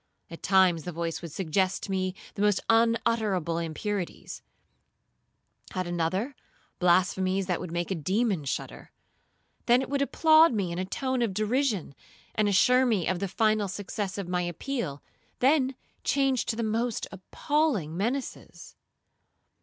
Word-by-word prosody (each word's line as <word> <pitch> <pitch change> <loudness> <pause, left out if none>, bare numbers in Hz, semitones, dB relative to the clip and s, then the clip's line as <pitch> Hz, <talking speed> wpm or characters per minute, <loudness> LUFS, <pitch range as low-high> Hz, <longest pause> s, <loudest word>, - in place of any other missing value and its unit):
At 165 - -9
times 185 -4 +4
the 180 - -6
voice 165 0 -3
would 170 -3 -7
suggest 185 +3 0
to 195 - -5
me 185 -1 -1 0.2
the 200 - -5
most 205 -1 +3
unutterable 225 -7 +1
impurities,—at 175 +4 -4 1.4
another, 175 - -1 0.4
blasphemies 185 +2 +2
that 180 -2 -1
would 175 - -6
make 175 +2 -2
a - - +3
demon 190 - 0
shudder. 135 - -5 0.8
Then 240 +1 +6
it 265 0 -4
would 280 0 +1
applaud 315 +2 +5
me 195 -5 -1
in 170 - -3
a 185 - -1
tone 260 +6 -2
of 220 -5 0
derision, 215 - 0 0.4
and 210 -1 +1
assure 250 +6 +4
me 205 -8 +1
of 185 -1 0
the 195 - -1
final 215 +1 +1
success 195 +1 -4
of 195 -3 -4
my 180 0 0
appeal, 175 - -4 0.3
then 265 0 +3 0.3
change 270 -3 +1
to 225 - -1
the 230 - -2
most 225 +1 -1
appalling 205 - -1
menaces. 240 +8 -4
200 Hz, 145 wpm, -28 LUFS, 180-235 Hz, 1.4 s, Then